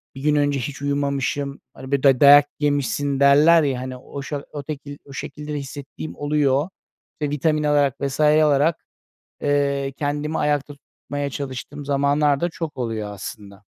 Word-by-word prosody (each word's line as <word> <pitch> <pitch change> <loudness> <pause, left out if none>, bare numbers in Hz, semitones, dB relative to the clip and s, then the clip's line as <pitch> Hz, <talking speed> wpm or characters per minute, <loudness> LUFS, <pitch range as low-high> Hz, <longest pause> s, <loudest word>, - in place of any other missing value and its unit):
bir 135 - -8
gün 150 0 +2
önce 145 -1 +1
hiç 140 +3 -5
uyumamışım, 140 0 -1
hani, 130 +1 -10
böyle, 140 -1 +1
day 135 -3 +5
dayak 145 +1 +9
yemişsin 145 -1 0
derler 150 +4 +6
ya, 130 -3 -1
hani, 130 0 -6
o 140 +2 -8
şe 145 0 -4
o 145 -1 -6
tekil 145 -1 -7
o 140 - -12
şekilde 150 +2 -6
de - - -2
hissettiğim 140 +2 -8
oluyor 145 +1 +1 0.5
ve 150 - 0
vitamin 150 +1 0
alarak 145 -2 +2
vs. 140 +1 -3
alarak, 150 +1 +3 0.6
eee, 140 -1 0
kendimi 150 +2 -2
ayakta 145 -1 0
tutmaya 145 0 -6
çalıştığım 140 +1 -6
zamanlar 140 0 +2
da 175 - +1
çok 165 -3 -6
oluyor 110 -4 -3
aslında. 100 0 -9
145 Hz, 160 wpm, -22 LUFS, 135-150 Hz, 0.6 s, dayak